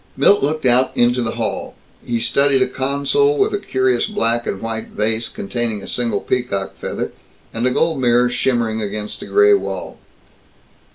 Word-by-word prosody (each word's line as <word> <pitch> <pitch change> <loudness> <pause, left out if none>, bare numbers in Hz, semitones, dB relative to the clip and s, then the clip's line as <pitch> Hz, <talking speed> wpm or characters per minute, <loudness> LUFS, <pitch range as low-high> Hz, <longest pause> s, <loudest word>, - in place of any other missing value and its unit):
Milt 200 - +4
looked 155 +1 -1
out 125 +1 +4
into 120 +1 +3
the 115 -1 -3
hall. - - -3 0.3
He 120 -1 -2
studied 135 +3 +3
a - - -1
console 140 - +1
with 410 +1 +1
a 410 - 0
curious 385 - 0
black 120 - 0
and 95 - -3
white 115 0 -4
vase 110 +1 -1
containing 110 -1 -3
a - - -9
single 115 -5 -1
peacock 100 -6 -2
feather, - - -4 0.4
and 115 +2 0
a - - +3
gold 160 +2 0
mirror 120 0 +3
shimmering 120 -3 0
against 105 0 -5
a - - -7
gray 415 0 +5
wall. 400 - -3
125 Hz, 170 wpm, -19 LUFS, 115-145 Hz, 0.4 s, gray